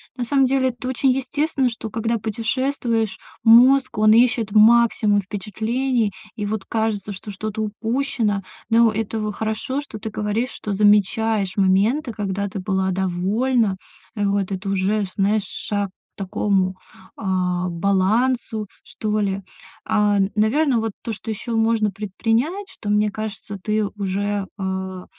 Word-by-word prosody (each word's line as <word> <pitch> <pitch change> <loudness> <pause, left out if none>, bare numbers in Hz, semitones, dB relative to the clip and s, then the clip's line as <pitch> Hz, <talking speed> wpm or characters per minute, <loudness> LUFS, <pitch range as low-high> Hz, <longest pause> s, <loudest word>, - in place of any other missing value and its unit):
На 250 - -3
самом 270 +3 +3
деле, 260 0 +2
это 250 +1 -7
очень 260 +1 +1
естественно, 270 +1 0
что 225 -1 -6
когда 225 +1 -1
путешествуешь, 230 0 -1 0.3
мозг, 255 +2 +6
он 215 0 +5
ищет 230 -2 +3
максимум 215 -1 +5
впечатлений, 220 +4 -1 0.2
и 210 - -3
вот 210 -1 -3
кажется, 220 -2 -2
что 200 +2 -7
что-то 215 +2 -4
упущено. 220 -1 -1 0.3
Но 230 0 +5
это 215 0 -2
хорошо, 220 +6 -2
что 285 -6 -9
ты 215 +1 -6
говоришь, 215 +5 -1
что 210 - -6
замечаешь 210 0 +2
моменты, 205 +9 +2
когда 200 -1 -2
ты 195 0 -5
была 190 0 0
довольна, 190 +4 +1 0.4
э, 205 - -1
вот 200 -1 0
это 195 +1 -3
уже, 195 +2 +1
знаешь, 205 +1 +2
шаг 205 -1 -3
к 185 - -41
такому, 195 -1 0 0.4
а, 180 -3 -1
балансу 210 +5 +1 0.2
что 215 0 -2
ли. 200 -1 -1 0.4
А, 205 -1 +2 0.2
наверно, 245 +5 +2
вот 225 0 -2
то, 230 - -4
что 220 +2 -6
еще 225 +2 -5
можно 225 -1 +2
предпринять, 225 - -1
что, 205 - -7
мне 210 0 +3
кажется, 215 -1 -6
ты 215 0 +1
уже, 200 0 -2
а, 190 -1 -4
215 Hz, 140 wpm, -22 LUFS, 200-230 Hz, 0.4 s, мозг